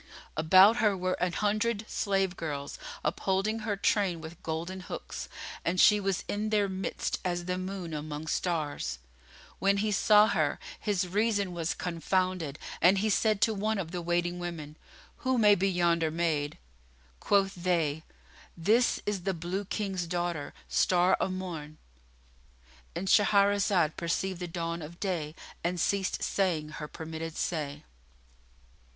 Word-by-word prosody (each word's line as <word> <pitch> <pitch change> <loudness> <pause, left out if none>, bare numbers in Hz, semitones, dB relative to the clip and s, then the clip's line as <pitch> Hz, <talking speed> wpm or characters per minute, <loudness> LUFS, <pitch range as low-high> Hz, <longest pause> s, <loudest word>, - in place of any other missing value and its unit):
About 185 +8 +7
her 210 -5 +2
were 185 0 0
an 180 -1 +1
hundred 215 +1 0
slave 195 -3 0
girls, 145 -4 -5 0.3
upholding 195 +6 0
her 210 -2 -2
train 195 -4 +1
with 160 +1 -10
golden 165 +4 -4
hooks, 180 - -7 0.3
and 180 +2 0
she 210 +2 +7
was 195 -2 -1
in 210 +1 -2
their 210 -2 +2
midst 190 0 -3
as 175 -1 -2
the 180 0 -1
moon 185 -3 -5
among 150 0 -5
stars. 155 - -2 0.6
When 200 +1 +3
he 210 +1 0
saw 210 +1 +6
her, 155 -7 +1 0.2
his 195 -3 0
reason 200 -1 +1
was 170 -1 -2
confounded 180 -3 -1 0.2
and 180 +4 +6
he 215 +2 +1
said 215 0 +2
to 225 - +4
one 215 +1 -1
of 170 -4 -4
the 180 -1 -3
waiting 175 +1 0
women, 165 -4 -6 0.4
"Who 260 0 0
may 210 -3 +6
be 195 0 +2
yonder 170 -3 +2
maid?" 155 -3 -1 0.6
Quoth 195 -1 +2
they, 170 -4 0 0.6
"This 220 +9 +3
is 205 -2 -1
the 190 +1 -1
Blue 175 +4 -3
King's 190 -3 -2
daughter, 175 -3 -2
Star 180 0 +3
o' - - +1
Morn."——And 60 - -10
Shahrazad 200 -5 +3
perceived 175 +2 -1
the 180 - -4
dawn 170 0 -3
of 165 +3 -9
day 165 -6 -2 0.3
and 175 +1 -1
ceased 195 +1 0
saying 170 -6 0
her 150 0 -6
permitted 160 0 -6
say. 150 -3 -2
180 Hz, 145 wpm, -29 LUFS, 160-200 Hz, 0.6 s, About